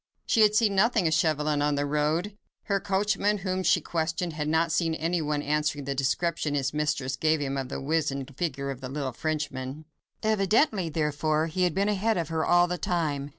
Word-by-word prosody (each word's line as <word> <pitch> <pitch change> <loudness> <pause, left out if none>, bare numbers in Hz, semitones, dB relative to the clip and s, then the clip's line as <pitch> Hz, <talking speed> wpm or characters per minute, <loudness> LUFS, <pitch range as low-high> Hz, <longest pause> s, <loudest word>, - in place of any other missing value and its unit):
She 225 - +3
had 210 -1 +5
seen 215 -2 +3
nothing 215 0 +3
of 160 - +1
Chauvelin 155 -2 +1
on 145 0 +1
the 145 0 0
road. 155 +7 0 0.3
Her 200 -1 0
coachman, 205 +1 +1
whom 185 -1 -2
she - - +3
questioned, 165 +1 -2
had 150 -1 -3
not 160 +1 +2
seen 165 0 +1
anyone 155 -3 -1
answering 150 -1 -1
the 140 - -1
description 145 +3 -1
his 140 0 -1
mistress 145 -3 -1
gave 155 0 +1
him 140 -1 -2
of 135 -2 -3
the - - -4
wizened 140 -2 -2
figure 140 -4 -2
of 135 -1 -8
the 130 - -6
little 135 -2 -3
Frenchman. 150 -1 -4 0.4
Evidently, 215 - +2
therefore, 155 0 0
he 180 +3 0
had 175 - -1
been 200 +1 +1
ahead 210 +1 +1
of 165 -2 -2
her 160 -1 -1
all 175 0 +4
the 175 0 -3
time. 150 -5 -1
155 Hz, 195 wpm, -27 LUFS, 145-180 Hz, 0.4 s, had